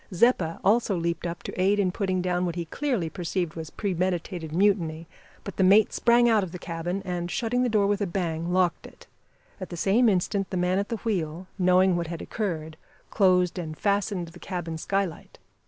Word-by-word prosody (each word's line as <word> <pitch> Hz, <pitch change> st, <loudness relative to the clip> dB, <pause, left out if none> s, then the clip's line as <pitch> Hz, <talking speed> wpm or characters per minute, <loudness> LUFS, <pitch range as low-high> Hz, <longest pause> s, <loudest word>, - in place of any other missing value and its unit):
Zeppa 180 Hz, -4 st, +2 dB
also 210 Hz, -2 st, +3 dB
leaped 170 Hz, +1 st, -2 dB
up 170 Hz, 0 st, -6 dB
to -, -, -4 dB
aid 200 Hz, +2 st, +3 dB
in 190 Hz, -3 st, +2 dB
putting 185 Hz, -1 st, -1 dB
down 180 Hz, 0 st, 0 dB
what 175 Hz, -2 st, -2 dB
he 170 Hz, -1 st, -3 dB
clearly 240 Hz, -, -1 dB
perceived 175 Hz, -1 st, -3 dB
was 160 Hz, -1 st, -7 dB
premeditated 180 Hz, -3 st, -2 dB
mutiny, 170 Hz, -3 st, +1 dB, 0.4 s
but 200 Hz, -, -8 dB
the 190 Hz, -, +3 dB
mate 200 Hz, +3 st, +5 dB
sprang 240 Hz, +1 st, +4 dB
out 220 Hz, -3 st, +4 dB
of 185 Hz, -3 st, -4 dB
the 180 Hz, -, -6 dB
cabin, 175 Hz, +2 st, -4 dB
and, 175 Hz, -1 st, -3 dB
shutting 245 Hz, +5 st, 0 dB
the 250 Hz, -, +2 dB
door 210 Hz, -3 st, +3 dB
with 205 Hz, +1 st, 0 dB
a 200 Hz, -, +1 dB
bang, 170 Hz, -2 st, -2 dB
locked 180 Hz, -2 st, +1 dB
it. -, -, -17 dB, 0.5 s
At 185 Hz, -, -6 dB
the 175 Hz, -, -6 dB
same 220 Hz, +7 st, +3 dB
instant 195 Hz, +1 st, 0 dB
the 185 Hz, -, -3 dB
man 180 Hz, +2 st, +1 dB
at 200 Hz, -, -3 dB
the 230 Hz, -, -2 dB
wheel 175 Hz, -5 st, -2 dB
knowing 185 Hz, 0 st, +4 dB
what 170 Hz, -1 st, -2 dB
had 170 Hz, 0 st, -5 dB
occurred 160 Hz, -7 st, -4 dB, 0.3 s
closed 180 Hz, -3 st, +3 dB
and 155 Hz, -3 st, -6 dB
fastened 200 Hz, -3 st, 0 dB
the 175 Hz, +2 st, -14 dB
cabin 170 Hz, -4 st, -5 dB
sky 195 Hz, +4 st, 0 dB
light. 165 Hz, -4 st, -11 dB
180 Hz, 205 wpm, -26 LUFS, 170-200 Hz, 0.5 s, mate